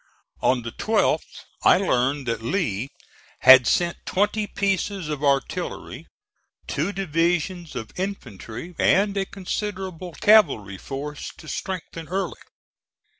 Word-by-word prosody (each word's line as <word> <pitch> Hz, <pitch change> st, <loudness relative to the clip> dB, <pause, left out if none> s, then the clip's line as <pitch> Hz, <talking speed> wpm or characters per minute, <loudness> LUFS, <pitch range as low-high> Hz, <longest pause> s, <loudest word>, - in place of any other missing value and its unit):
On 125 Hz, -2 st, +2 dB
the 115 Hz, -, -5 dB
12th 220 Hz, -, 0 dB, 0.2 s
I -, -, +6 dB
learned 140 Hz, -6 st, +1 dB
that 115 Hz, -2 st, -2 dB
Lee 120 Hz, -, -1 dB, 0.5 s
had 130 Hz, -1 st, +9 dB
sent 170 Hz, -1 st, +1 dB
twenty 210 Hz, +2 st, 0 dB
pieces 195 Hz, -3 st, -1 dB
of 150 Hz, -1 st, -4 dB
artillery, 140 Hz, -1 st, -1 dB, 0.6 s
two 160 Hz, +8 st, -1 dB
divisions 175 Hz, -1 st, -1 dB
of 115 Hz, -3 st, -5 dB
infantry 140 Hz, -, -6 dB
and 200 Hz, +1 st, +3 dB
a 195 Hz, -1 st, -1 dB
considerable 190 Hz, -3 st, -5 dB
cavalry 145 Hz, -, +4 dB
force 145 Hz, +2 st, -6 dB
to 155 Hz, -, -13 dB
strengthen 165 Hz, -2 st, -5 dB
Early. 185 Hz, +1 st, -3 dB
170 Hz, 115 wpm, -24 LUFS, 135-195 Hz, 0.6 s, had